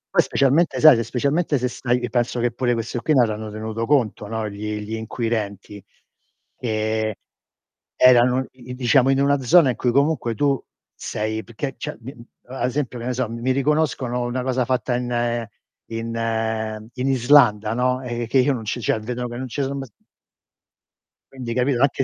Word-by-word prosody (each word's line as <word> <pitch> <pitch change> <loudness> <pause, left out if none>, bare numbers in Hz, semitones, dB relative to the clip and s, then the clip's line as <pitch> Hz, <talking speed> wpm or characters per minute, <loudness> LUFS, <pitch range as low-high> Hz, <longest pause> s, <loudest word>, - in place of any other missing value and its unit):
Poi, - - +7
specialmente 140 +5 +2
sai, 155 -4 +9
se 115 - 0
specialmente 145 +5 0
se 125 0 -1
stai 125 0 -1
penso 120 0 0
che 120 0 +1
pure 125 -2 0
questi 115 +1 -3
qui 150 +5 +1
non 120 -3 +5
hanno 110 0 -5
tenuto 110 +2 -4
conto, 120 -7 +1
no, 110 -1 -3
gli 105 +1 -5
gli 105 +2 -6
inquirenti, 110 -3 -4 0.7
che 110 -2 -1 0.8
erano, 125 +1 +5
i 125 -1 -15
i - - -5
diciamo, 130 +1 +3
in 135 - +2
una 140 0 +3
zona 135 +1 +5
in - - -5
cui 125 - 0
comunque 140 -4 +1
tu 140 +1 +1 0.3
sei 110 +1 -3
perché 125 +4 -5
cioè, - - -5
mhmm, 120 +1 -10 0.3
ad 125 0 -2
esempio, 130 -2 -3
che 120 - -6
ne 125 - -1
so, 130 -3 -1
mi 115 0 -6
mi 130 - -1
riconoscono 135 -3 0
una 125 +1 -2
cosa 130 -1 0
fatta 125 0 0
in 120 -1 -1 0.4
in 115 0 -5
mhmm, 110 -1 -2
Islanda, 125 -4 +4
no, 125 +1 0
eh, 120 -2 -4
che 135 - +1
io 135 +2 +3
non 115 -4 -5
c 120 - -3
cioè, 110 - 0
vedono 125 +2 -4
che 120 - -7
non 130 - -5
ce 140 +3 -3
so 135 +1 -2
mai 135 -1 -5
s - - -27 1.4
Quindi, 125 -3 -5
capito? 125 +1 +1
Anche 140 -1 +2
120 Hz, 185 wpm, -22 LUFS, 115-130 Hz, 1.4 s, sai